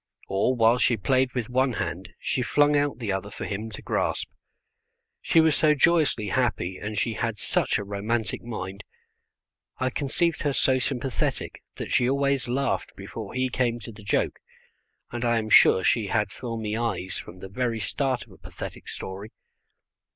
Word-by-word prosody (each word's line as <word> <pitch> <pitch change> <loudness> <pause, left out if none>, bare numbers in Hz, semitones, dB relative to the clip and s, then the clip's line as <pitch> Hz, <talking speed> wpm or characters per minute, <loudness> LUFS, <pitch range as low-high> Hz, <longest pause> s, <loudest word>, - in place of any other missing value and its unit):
Or 100 +7 +1
while 115 +1 +4
she 120 - +3
played 130 +6 +2
with 120 -4 -1
one 130 +1 +2
hand, 100 -3 -4
she 130 - -1
flung 145 +4 +3
out 145 -4 +1
the 115 -5 -2
other 95 +1 -2
for - - -6
him 105 +2 -4
to 105 - -8
grasp. - - -1 0.9
She 165 - +4
was 160 -2 +5
so 150 -1 +4
joyously 150 - +3
happy, 105 -7 0
and 105 0 -5
she 115 +3 +1
had 115 -1 -2
such - - +1
a - - -3
romantic 105 +3 -2
mind. 100 -4 -6 0.9
I 130 0 0
conceived 155 +6 0
her 145 -2 +1
so 130 -1 +3
sympathetic 130 -1 -2
that - - -6
she 125 - +3
always 140 -1 +1
laughed 135 +3 -1
before - - -7
he 130 0 +1
came 120 -2 0
to 115 - -8
the 105 0 -13
joke, 100 - 0 0.7
and 120 0 -3
I 120 -1 +3
am 110 -1 -2
sure 95 - +7
she 110 +1 +2
had 105 -1 0
filmy 110 -2 -4
eyes 115 -5 -2
from 90 - -10
the 95 - -8
very 115 +3 -1
start 130 +4 -1
of - - -21
a - - -16
pathetic - - -8
story. 95 +3 -6
120 Hz, 175 wpm, -26 LUFS, 105-130 Hz, 0.9 s, sure